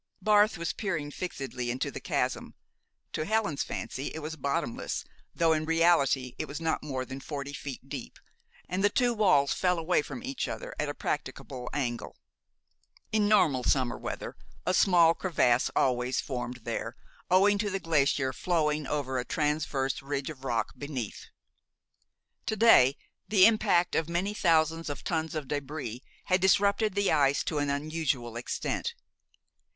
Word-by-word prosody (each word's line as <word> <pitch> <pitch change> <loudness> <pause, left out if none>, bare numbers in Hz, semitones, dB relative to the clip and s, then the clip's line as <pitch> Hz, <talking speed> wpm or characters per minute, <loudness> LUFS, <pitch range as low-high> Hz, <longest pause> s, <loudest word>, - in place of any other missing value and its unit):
Barth 210 -1 +4
was 170 0 -2
peering 160 -8 -3
fixedly 135 -8 -4
into 125 +2 -2
the - - -6
chasm. - - -2 0.6
To - - -1
Helen's 205 -6 0
fancy 135 +2 -4
it - - -4
was 160 +1 -5
bottomless, 140 -5 -2 0.3
though 165 -1 +3
in 155 0 0
reality 155 -6 +3
it - - -2
was 145 - -6
not 165 -1 -1
more 130 -3 -3
than 130 +1 -7
forty 140 0 -6
feet 135 -2 -7
deep, 135 -3 -7 0.5
and 185 +2 -2
the 205 - +5
two 245 +2 +2
walls 185 -11 +3
fell 180 -1 +1
away 165 0 +2
from 235 - -8
each 265 0 -3
other - - -6
at - - 0
a - - -4
practicable 130 -4 -4
angle. 125 -5 -3 0.9
In 215 -1 +2
normal 155 -12 +4
summer 130 -2 +1
weather, - - -6 0.3
a 185 - +1
small 175 -4 +5
crevasse 130 -10 +2
always 125 0 +1
formed 125 -2 -4
there 115 - -4 0.3
owing 200 +3 +5
to 210 0 0
the 195 0 -2
glacier 140 -5 +1
flowing 150 -4 0
over 130 -3 -1
a - - -1
transverse 150 -2 -1
ridge 140 +1 -3
of 135 -3 -12
rock 120 -4 -1
beneath. 135 -7 -5 1.2
To 220 - 0
day 175 - +6 0.3
the 195 -3 +6
impact 210 -6 +3
of 160 0 0
many 180 +4 -1
thousands 165 -4 +2
of 145 - -5
tons 160 -1 -2
of 155 -2 -3
débris 140 -4 -4 0.2
had 185 0 +2
disrupted 200 +2 +3
the 200 -1 +2
ice 140 -2 +3
to 155 - -1
an 145 0 0
unusual 140 -5 -2
extent. 120 - -3
155 Hz, 155 wpm, -29 LUFS, 135-185 Hz, 1.2 s, day